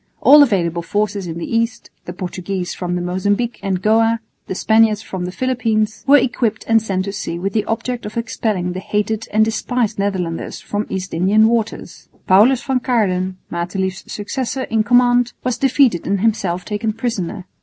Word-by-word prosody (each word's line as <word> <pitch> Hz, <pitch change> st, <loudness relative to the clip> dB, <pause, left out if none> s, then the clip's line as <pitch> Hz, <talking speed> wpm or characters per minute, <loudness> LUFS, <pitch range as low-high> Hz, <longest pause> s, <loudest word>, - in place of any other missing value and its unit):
All 295 Hz, +1 st, +8 dB
available 175 Hz, -, +2 dB
forces 205 Hz, +1 st, -2 dB
in 165 Hz, 0 st, -5 dB
the 170 Hz, -, -4 dB
East 230 Hz, 0 st, -1 dB
(the -, -, -5 dB
Portuguese 180 Hz, 0 st, -4 dB
from 180 Hz, -1 st, -3 dB
the 175 Hz, -, -2 dB
Mozambique 205 Hz, +6 st, -1 dB
and 190 Hz, -2 st, -2 dB
Goa, 225 Hz, +1 st, +3 dB, 0.3 s
the 190 Hz, -, -4 dB
Spaniards 220 Hz, +1 st, +3 dB
from 185 Hz, -4 st, -5 dB
the 180 Hz, -, -4 dB
Philippines) 220 Hz, -2 st, -1 dB
were 285 Hz, +1 st, +8 dB
equipped 235 Hz, -4 st, 0 dB
and 225 Hz, 0 st, +4 dB
sent 190 Hz, -3 st, -2 dB
to 200 Hz, -, -4 dB
sea 170 Hz, -4 st, -4 dB
with 195 Hz, +3 st, -3 dB
the 215 Hz, -2 st, 0 dB
object 235 Hz, +1 st, -3 dB
of 215 Hz, -, -8 dB
expelling 215 Hz, -6 st, -1 dB
the 185 Hz, -, -4 dB
hated 210 Hz, +3 st, -2 dB
and 215 Hz, +1 st, +4 dB
despised 225 Hz, -1 st, -1 dB
Netherlanders 185 Hz, -4 st, -2 dB
from 205 Hz, +1 st, -3 dB
East 185 Hz, -1 st, -4 dB
Indian 200 Hz, +6 st, +4 dB
waters. 225 Hz, -1 st, -3 dB, 0.2 s
Paulus 225 Hz, +7 st, +5 dB
van 265 Hz, -2 st, 0 dB
Caerden, 190 Hz, -7 st, 0 dB
Matelief's 185 Hz, +2 st, -3 dB
successor 260 Hz, +5 st, -3 dB
in 225 Hz, -3 st, 0 dB
command, 245 Hz, +1 st, +3 dB
was 250 Hz, -1 st, -1 dB
defeated 265 Hz, -, +2 dB
and 195 Hz, -1 st, 0 dB
himself 195 Hz, -5 st, 0 dB
taken 215 Hz, +1 st, -2 dB
prisoner. 215 Hz, -6 st, -3 dB
210 Hz, 175 wpm, -19 LUFS, 185-230 Hz, 0.3 s, All